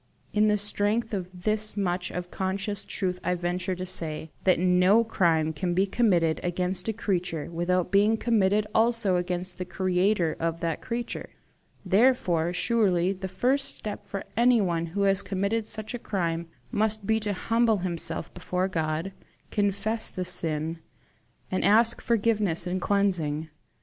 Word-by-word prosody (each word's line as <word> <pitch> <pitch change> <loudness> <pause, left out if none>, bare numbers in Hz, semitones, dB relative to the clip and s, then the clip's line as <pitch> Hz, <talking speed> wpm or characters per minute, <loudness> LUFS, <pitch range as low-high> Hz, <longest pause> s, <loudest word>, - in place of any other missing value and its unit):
In 210 0 +3
the 210 0 +3
strength 210 +2 +1
of 180 -2 -5
this 215 +1 +2
much 180 -2 -1
of 180 0 -6
conscious 195 +2 -2
truth 180 -2 -2
I 180 - +1
venture 180 +1 -2
to 185 +1 -5
say 160 -4 -2
that 185 - +5
no 180 +5 +4
crime 165 -7 +1
can 175 +3 -2
be 190 +2 +3
committed 185 -7 +2
against 180 +2 -1
a 225 - 0
creature 180 -7 -2
without 175 +1 0
being 210 +3 +4
committed 210 -3 +2
also 225 -4 +2
against 180 0 -3
the - - -1
creator 185 -1 +1
of 165 0 -1
that 165 -1 -2
creature; 235 0 -4 0.6
therefore 185 -7 +3
surely 190 -2 +2
the 190 0 -6
first 255 +9 +1
step 210 - -7
for 195 - -5
anyone 210 -9 +3
who 200 +5 -2
has 195 0 +3
committed 200 +3 -1
such 215 +2 -4
a 245 - -4
crime 170 -6 -2 0.2
must 215 -2 0
be 220 +1 +2
to 210 -1 -2
humble 225 +2 +2
himself 175 -3 -4
before 180 +1 -2
God, 160 0 -2 0.4
confess 205 +2 -1
the 185 - -4
sin, 165 -2 -3 0.7
and 185 - 0
ask 225 +5 +5
forgiveness 215 -6 +1
and 180 +1 -2
cleansing. 170 -7 0
190 Hz, 150 wpm, -27 LUFS, 175-215 Hz, 0.7 s, that